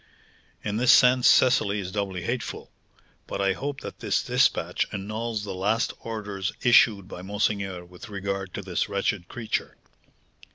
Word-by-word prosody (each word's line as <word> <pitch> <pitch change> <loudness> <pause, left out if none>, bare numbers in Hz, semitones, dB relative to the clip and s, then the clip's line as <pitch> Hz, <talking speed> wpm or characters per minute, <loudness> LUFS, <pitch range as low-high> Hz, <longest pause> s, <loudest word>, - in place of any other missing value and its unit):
"In 105 0 -2
this 125 +1 +5
sense 125 0 +6
Cecily 110 -5 +4
is 95 -2 -5
doubly 95 -3 -3
hateful. 125 0 -4 0.6
But - - -4
I 100 -1 +2
hope 140 +5 -5
that - - -8
this - - 0
despatch - - +1
annuls 110 +2 -3
the 105 - -5
last 105 +5 0
orders 105 -4 -4
issued 110 -6 +5
by 90 - -8
monseigneur 100 -2 -2
with 90 +4 -12
regard 100 -1 -4
to 100 - -5
this 90 +2 -2
wretched 100 -2 -1
creature." 115 -3 -4
100 Hz, 150 wpm, -26 LUFS, 95-115 Hz, 0.6 s, sense